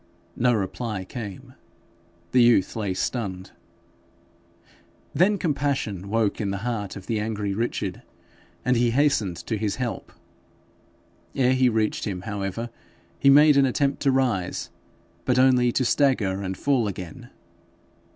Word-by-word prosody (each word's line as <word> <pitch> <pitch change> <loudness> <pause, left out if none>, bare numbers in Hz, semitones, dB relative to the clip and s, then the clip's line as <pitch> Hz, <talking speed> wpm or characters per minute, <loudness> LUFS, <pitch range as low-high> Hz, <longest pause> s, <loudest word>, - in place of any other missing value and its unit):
No 125 0 +2
reply 105 0 -3
came. 105 -2 -8 0.8
The 125 - +5
youth 120 -6 +4
lay 100 -4 -2
stunned. 95 -5 -3 1.6
Then 200 +4 +3
compassion 140 - -2
woke 110 0 0
in 100 - -1
the 100 +3 -4
heart 110 -5 -3
of 95 -2 -9
the 110 -2 -1
angry 105 -2 -2
Richard, 115 +4 -3 0.6
and 125 0 +3
he 120 0 +3
hastened 115 - +1
to 110 - -2
his 105 -2 -1
help. 125 -3 -4 1.2
Ere 130 -1 +3
he 130 -1 +3
reached 110 -2 0
him, 95 -4 -4
however, 100 +3 -4 0.5
he 140 - +5
made 145 +1 +7
an 135 -1 +5
attempt 140 +2 0
to 140 - +3
rise, 125 -9 -1 0.5
but 125 -1 +1
only 125 -1 +4
to 130 - 0
stagger 115 -9 +2
and 95 -1 -4
fall 135 -6 +1
again. 90 -4 -7
115 Hz, 135 wpm, -24 LUFS, 100-130 Hz, 1.6 s, made